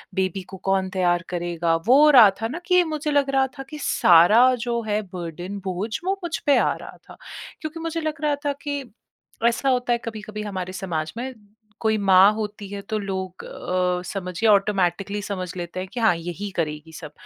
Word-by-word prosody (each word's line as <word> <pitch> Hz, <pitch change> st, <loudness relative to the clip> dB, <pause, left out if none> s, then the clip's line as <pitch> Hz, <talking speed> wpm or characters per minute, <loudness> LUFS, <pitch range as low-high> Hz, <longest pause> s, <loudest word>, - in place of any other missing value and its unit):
Baby 190 Hz, 0 st, -1 dB
को 190 Hz, -, -7 dB
कौन 190 Hz, -1 st, +1 dB
तैयार 175 Hz, -2 st, +1 dB
करेगा? 170 Hz, -1 st, -1 dB
वो 265 Hz, +4 st, +7 dB
हो 305 Hz, -, +7 dB
रहा 245 Hz, -7 st, +9 dB
था 225 Hz, -, 0 dB
ना 295 Hz, +9 st, -5 dB
कि 360 Hz, -1 st, +4 dB
मुझे 310 Hz, -2 st, -3 dB
लग 285 Hz, -1 st, +2 dB
रहा 270 Hz, -1 st, +2 dB
था -, -, -4 dB
कि 305 Hz, -, -7 dB
सारा 215 Hz, +10 st, +6 dB
जो 235 Hz, -1 st, -1 dB
है 210 Hz, 0 st, 0 dB
बर्डन 175 Hz, +3 st, -6 dB
बोझ 185 Hz, +4 st, -3 dB, 0.2 s
वो 390 Hz, +1 st, 0 dB
मुझ 340 Hz, -1 st, -2 dB
पे 285 Hz, -2 st, +5 dB
आ -, -, +2 dB
रहा -, -, -11 dB
था। -, -, -12 dB, 0.4 s
क्योंकि 310 Hz, +1 st, -6 dB
मुझे 330 Hz, 0 st, -3 dB
लग 310 Hz, -1 st, -4 dB
रहा 300 Hz, -1 st, +1 dB
था 285 Hz, -, +1 dB
कि 285 Hz, -3 st, -3 dB, 0.6 s
ऐसा 235 Hz, +3 st, +1 dB
होता 250 Hz, -1 st, +1 dB
है -, -, +2 dB
कभी-कभी 215 Hz, -1 st, -6 dB
हमारे 185 Hz, -3 st, -5 dB
समाज 165 Hz, -5 st, -3 dB
में 260 Hz, +2 st, -4 dB, 0.5 s
कोई 220 Hz, -1 st, +2 dB
माँ 195 Hz, 0 st, +6 dB
होती 210 Hz, -1 st, -5 dB
है 200 Hz, 0 st, -6 dB
तो 215 Hz, -, 0 dB
लोग 190 Hz, -2 st, -5 dB
अ, 180 Hz, 0 st, -1 dB
समझिए 185 Hz, +3 st, -1 dB
ऑटोमैटिकली 200 Hz, -1 st, +1 dB
समझ 190 Hz, -2 st, -4 dB
लेते 175 Hz, +1 st, -5 dB
हैं 185 Hz, -, -4 dB
कि 245 Hz, -, -4 dB
हाँ, 220 Hz, -6 st, +4 dB
यही 175 Hz, +4 st, -5 dB
करेगी 155 Hz, -1 st, -3 dB
सब। 155 Hz, -3 st, -9 dB
205 Hz, 200 wpm, -23 LUFS, 180-255 Hz, 0.6 s, रहा